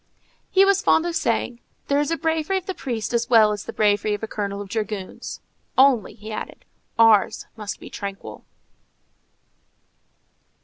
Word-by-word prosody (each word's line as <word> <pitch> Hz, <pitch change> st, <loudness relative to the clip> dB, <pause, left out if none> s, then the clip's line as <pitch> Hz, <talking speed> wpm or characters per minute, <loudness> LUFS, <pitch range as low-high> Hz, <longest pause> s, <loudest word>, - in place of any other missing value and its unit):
He 390 Hz, +1 st, +5 dB
was 395 Hz, 0 st, +3 dB
fond 340 Hz, -6 st, +3 dB
of 345 Hz, -1 st, -2 dB
saying, 235 Hz, -1 st, -1 dB, 0.3 s
"There 280 Hz, 0 st, +2 dB
is 290 Hz, -, 0 dB
a 330 Hz, -, 0 dB
bravery 320 Hz, +4 st, 0 dB
of 375 Hz, -, -5 dB
the 380 Hz, -, -3 dB
priest 240 Hz, -8 st, -4 dB
as 235 Hz, 0 st, 0 dB
well 220 Hz, -3 st, +6 dB
as 210 Hz, -1 st, -4 dB
the -, -, -5 dB
bravery 210 Hz, 0 st, +2 dB
of 205 Hz, -, -10 dB
a -, -, -2 dB
colonel 200 Hz, -2 st, -4 dB
of 205 Hz, -, -6 dB
dragoons,—only," 220 Hz, +4 st, -1 dB
he 215 Hz, 0 st, -9 dB
added, 215 Hz, -, -7 dB, 0.3 s
"ours 225 Hz, -3 st, +4 dB
must 210 Hz, -2 st, -6 dB
be -, -, -11 dB
tranquil." 200 Hz, -1 st, -7 dB
225 Hz, 160 wpm, -23 LUFS, 210-300 Hz, 0.3 s, well